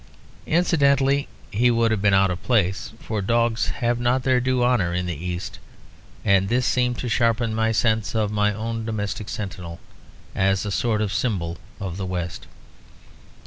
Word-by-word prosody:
Incidentally, 140 -5 +3 0.2
he 120 +4 +3
would 115 -1 +2
have 110 -3 0
been 100 0 +4
out 95 -1 +4
of 90 - -5
place; 95 -6 0
for 110 -2 -3
dogs 115 +2 +1
have 120 -1 -1
not 125 +2 +1
their 130 -1 +3
due 125 0 +1
honour 110 -9 +2
in 90 0 -1
the 90 - -2
East; 90 +3 -5 0.7
and 95 0 +3
this 125 +2 +1
seemed 125 -1 +1
to 125 - -4
sharpen 115 -1 +1
my 110 0 +1
sense 110 0 +1
of 105 -2 +1
my 105 0 +2
own 115 +2 -4
domestic 105 -2 -3
sentinel 90 -5 -6 0.5
as 95 +1 +1
a 105 - -3
sort 110 +1 +1
of 105 0 -2
symbol 85 -9 -1 0.2
of 95 -3 -5
the 95 - -3
West. 90 -1 -4
110 Hz, 170 wpm, -23 LUFS, 95-120 Hz, 0.7 s, been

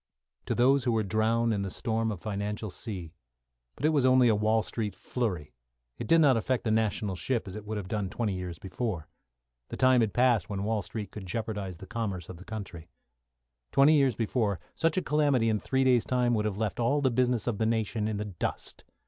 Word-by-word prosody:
To - - 0
those 135 +2 +4
who 120 - +2
were 110 -1 +1
drowned 110 +3 +1
in 100 - -1
the 100 - -3
storm 110 +2 -1
of 100 - -5
financial 105 +2 -4
sea. 90 -7 -6 0.6
But 145 - -3
it - - +5
was 150 -4 +2
only 130 -1 +5
a 110 - +4
Wall 110 +1 +2
Street 105 -5 -3
flurry; 95 - -3 0.5
it - - -4
did 165 0 +5
not 140 -4 +5
affect 120 +3 0
the 110 - 0
national 110 -3 0
ship 115 +4 -2
as 95 - -7
it 105 -1 -7
would 110 0 -3
have 100 -3 -5
done 100 -1 -2
twenty 110 0 -2
years 90 -2 -5
before. 95 -2 -4 0.6
The - - -6
time 130 -1 +5
had 110 -2 +1
passed 120 -3 +2
when 100 -1 -3
Wall 110 0 0
Street 105 -1 -6
could 100 -3 -8
jeopardise 105 -3 -4
the 95 - -10
commerce 100 -5 -4
of 90 - -8
the 95 - -13
country. 95 -6 -7 0.8
Twenty 140 +3 +6
years 135 -5 +3
before, 110 -4 0
such 165 +2 0
a 185 - +1
calamity 145 -6 +2
in 110 -1 +1
three 130 +4 0
days' 125 -3 +4
time 125 -1 +1
would 105 -2 +1
have 105 -2 -2
left 110 -1 -2
all 140 +5 +2
the 130 -2 +2
business 125 -2 +1
of 115 -4 -2
the 110 - +2
nation 110 -1 0
in 110 -1 -2
the 105 - -3
dust. 95 -5 -5
110 Hz, 220 wpm, -29 LUFS, 100-125 Hz, 0.8 s, Twenty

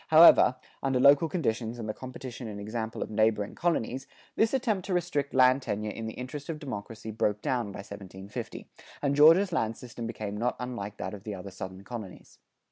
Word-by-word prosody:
However, 160 -5 +8 0.3
under 135 -2 +1
local 140 +4 +6
conditions 120 -8 -1
and 115 -2 -5
the 110 - -2
competition 130 0 -7
and 105 -1 -6
example 110 +2 -3
of - - -9
neighboring 110 -1 +2
colonies, 135 -7 -1 0.3
this 220 - +3
attempt 230 -8 0
to 185 - 0
restrict 150 -5 -1
land 130 +1 +5
tenure 105 -3 -2
in 115 +1 -5
the 110 - -6
interest 135 +4 -7
of 160 - -2
democracy 115 -5 -6
broke 105 -1 0
down 125 -5 0
by 100 - -7
1750, 100 0 -8 0.4
and 140 0 +2
Georgia's 165 +6 +7
land 115 -7 0
system 120 -2 -7
became 105 -3 -5
not 120 +4 0
unlike 110 -5 -5
that - - -4
of 100 -2 -8
the 105 -2 -4
other 95 +1 -8
Southern 95 0 -7
colonies. 110 -4 -9
120 Hz, 190 wpm, -29 LUFS, 105-140 Hz, 0.4 s, However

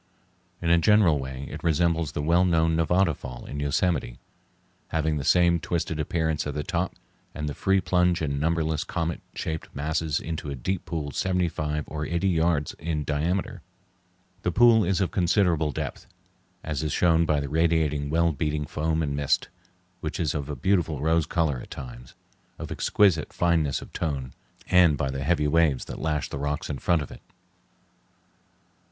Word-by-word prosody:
In 85 - +2
a 85 - +6
general 90 -4 +4
way 65 0 -6
it - - -7
resembles 85 -1 +1
the 75 - -2
well 85 +4 +4
known 80 -2 +2
Nevada 85 +2 +2
Fall 60 -3 -9
in 70 - -6
Yosemite, 70 -2 0 0.7
having 80 -1 0
the 70 - -3
same 85 +4 +4
twisted 80 -2 -2
appearance 80 -1 -1
at 75 - -4
the 75 - -2
top 90 +1 -2 0.4
and 75 0 -3
the 75 - -3
free 95 +5 +2
plunge 90 -1 +2
in 70 -3 -2
numberless 80 -1 0
comet 85 -1 -3
shaped 80 0 -4
masses 75 +1 -1
into 80 -3 -5
a 70 - -3
deep 90 +8 -3
pool 75 -4 -4
seventy 90 +4 0
five 75 -2 -2
or 75 -1 -5
eighty 85 +3 0
yards 80 -4 +1
in 80 -2 -2
diameter. 80 +6 -1 0.8
The 90 - 0
pool 115 +2 +6
is 95 +1 +1
of 95 - 0
considerable 85 -4 +2
depth, - - -5 0.6
as 75 -2 -3
is 75 -2 -2
shown 85 0 +3
by 75 -1 +2
the 70 - -3
radiating 80 -2 +1
well 85 +2 +2
beaten 75 0 -2
foam 80 +2 -1
and 70 -2 -2
mist, 70 -1 0 0.5
which 75 -1 -4
is 80 -5 0
of 75 -2 -4
a 75 - -3
beautiful 80 0 +1
rose 80 +1 +2
color 80 -7 0
at - - -11
times, - - -9 0.4
of - - -7
exquisite 95 -7 +2
fineness 80 -5 +1
of - - -15
tone, 70 -6 -3 0.3
and 90 -5 +5
by 70 -1 -1
the 70 0 -4
heavy 75 0 +1
waves 75 -3 +2
that - - -7
lash 75 -3 -1
the 70 - -6
rocks 75 +2 -2
in 70 - -4
front 85 +1 +1
of - - -10
it. - - -11
80 Hz, 175 wpm, -26 LUFS, 75-85 Hz, 0.8 s, a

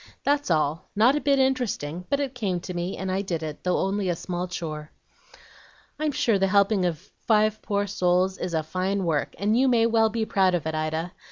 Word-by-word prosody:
That's 285 -3 +1
all, 155 0 0
not 235 +7 +5
a 295 - -1
bit 280 -1 +3
interesting, 235 - -1
but 280 - +1
it 275 -2 -2
came 200 -8 -2
to 180 - -6
me, 175 +2 -3
and 190 0 -3
I 190 +1 0
did 170 -5 -3
it, 155 -1 -6
though 180 -1 +1
only 195 0 0
a 175 - +1
small 180 +1 -4
chore." 155 -3 -5 1.1
"I'm 305 -1 0
sure 230 -6 +1
the 195 - +3
helping 200 0 +3
of 165 -4 -4 0.2
five 215 -1 +3
poor 205 0 -1
souls 185 -1 +1
is 180 -2 -3
a 160 - 0
fine 185 +4 -1
work, 155 -4 -1
and 205 +4 +1
you 260 +3 +3
may 235 -3 +4
well 225 -1 +3
be 220 0 -2
proud 190 -3 +2
of 165 - -3
it, 160 - -2
Ida. 160 +2 -2
190 Hz, 215 wpm, -25 LUFS, 175-220 Hz, 1.1 s, not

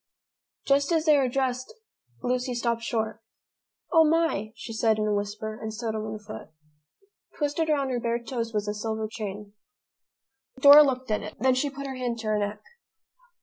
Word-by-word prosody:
Just 280 +3 +2
as 325 -1 +2
they 305 -2 +6
were 270 -3 +2
dressed, 255 - -1 0.5
Lucy 250 0 -1
stopped 235 -1 -1
short. 220 -1 -2 0.7
"O 325 -2 +7
my!" 315 -10 +1
she 245 -3 -8
said 220 -1 +2
in 215 - 0
a 210 - +1
whisper, 205 +1 -3
and 220 - -4
stood 220 0 -4
on 215 -1 -3
one 215 0 -5
foot. 210 -5 -10 0.9
Twisted 300 +2 0
about 280 -3 +1
her 245 - -1
bare 235 0 0
toes 235 -1 -4
was 210 -2 -1
a - - 0
little 210 0 -6
silver 220 -1 -2
chain. 210 -2 -7 1.1
Dora 285 +2 +10
looked 260 -4 0
at 210 - +1
it. - - -8
Then 260 0 +3
she 260 +3 0
put 280 0 -7
her 265 -1 -5
hand 245 -2 -2
to 225 -1 -6
her 215 0 +1
neck. 205 +1 -3
235 Hz, 190 wpm, -26 LUFS, 215-275 Hz, 1.1 s, Dora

